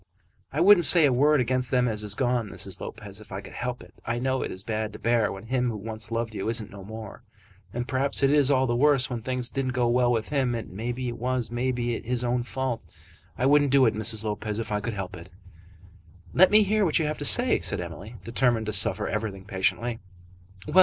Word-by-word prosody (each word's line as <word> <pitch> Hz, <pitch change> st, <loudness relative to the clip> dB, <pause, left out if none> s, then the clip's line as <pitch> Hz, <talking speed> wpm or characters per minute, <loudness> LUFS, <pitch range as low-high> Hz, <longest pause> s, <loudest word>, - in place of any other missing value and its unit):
"I 150 Hz, -, -1 dB
wouldn't 185 Hz, -2 st, +7 dB
say 165 Hz, +1 st, +8 dB
a 135 Hz, -, +3 dB
word 145 Hz, +4 st, +3 dB
against 125 Hz, 0 st, +1 dB
them 125 Hz, -1 st, +2 dB
as 105 Hz, -2 st, -1 dB
is 105 Hz, -1 st, -1 dB
gone, 120 Hz, -3 st, -1 dB
Mrs. -, -, -6 dB
Lopez, 105 Hz, 0 st, -8 dB
if 105 Hz, -, -16 dB
I 95 Hz, -, -4 dB
could 100 Hz, -, -12 dB
help 125 Hz, 0 st, -5 dB
it. -, -, -18 dB
I 120 Hz, 0 st, -2 dB
know 130 Hz, +1 st, -1 dB
it -, -, -3 dB
is 95 Hz, -, -7 dB
bad 110 Hz, 0 st, -3 dB
to -, -, -8 dB
bear 115 Hz, -1 st, +1 dB
when 95 Hz, +2 st, -9 dB
him 125 Hz, +1 st, 0 dB
who 110 Hz, -, -4 dB
once 110 Hz, +1 st, -6 dB
loved 115 Hz, -1 st, -3 dB
you 105 Hz, +1 st, -3 dB
isn't 110 Hz, -2 st, -1 dB
no 100 Hz, -1 st, -10 dB
more. 110 Hz, +2 st, -9 dB, 0.5 s
And 120 Hz, +3 st, -4 dB
perhaps 135 Hz, +1 st, 0 dB
it 135 Hz, -, +4 dB
is 145 Hz, -2 st, +4 dB
all 130 Hz, -2 st, +3 dB
the 120 Hz, -2 st, -1 dB
worse 135 Hz, 0 st, +3 dB
when 120 Hz, -2 st, -4 dB
things 125 Hz, +1 st, -3 dB
didn't 130 Hz, -2 st, -2 dB
go 125 Hz, -1 st, +1 dB
well 120 Hz, 0 st, +2 dB
with 115 Hz, -2 st, -1 dB
him, 130 Hz, -4 st, 0 dB
and 105 Hz, -4 st, -7 dB
it 120 Hz, 0 st, -4 dB
was, 125 Hz, -1 st, -2 dB
maybe, 120 Hz, -1 st, -2 dB
his 125 Hz, +1 st, -1 dB
own 120 Hz, 0 st, 0 dB
fault. 125 Hz, 0 st, -4 dB, 0.5 s
I 125 Hz, -, 0 dB
wouldn't 145 Hz, +1 st, +4 dB
do 135 Hz, 0 st, +5 dB
it, 110 Hz, -, +2 dB
Mrs. 110 Hz, 0 st, 0 dB
Lopez, 105 Hz, 0 st, -4 dB
if 115 Hz, -1 st, -5 dB
I 105 Hz, -, 0 dB
could 115 Hz, 0 st, -4 dB
help 95 Hz, -2 st, -6 dB
it." 85 Hz, +1 st, -12 dB, 1.0 s
"Let 185 Hz, +1 st, +6 dB
me 215 Hz, 0 st, +6 dB
hear 210 Hz, +1 st, +1 dB
what 165 Hz, -5 st, +2 dB
you 160 Hz, -, 0 dB
have 150 Hz, 0 st, -3 dB
to -, -, -4 dB
say," 245 Hz, -, +5 dB
said 100 Hz, -, 0 dB
Emily, 90 Hz, +6 st, -8 dB
determined 115 Hz, 0 st, +1 dB
to 110 Hz, -, -3 dB
suffer 100 Hz, -, +3 dB
everything 105 Hz, -3 st, -4 dB
patiently. 105 Hz, +4 st, -1 dB
120 Hz, 230 wpm, -26 LUFS, 110-130 Hz, 1.0 s, say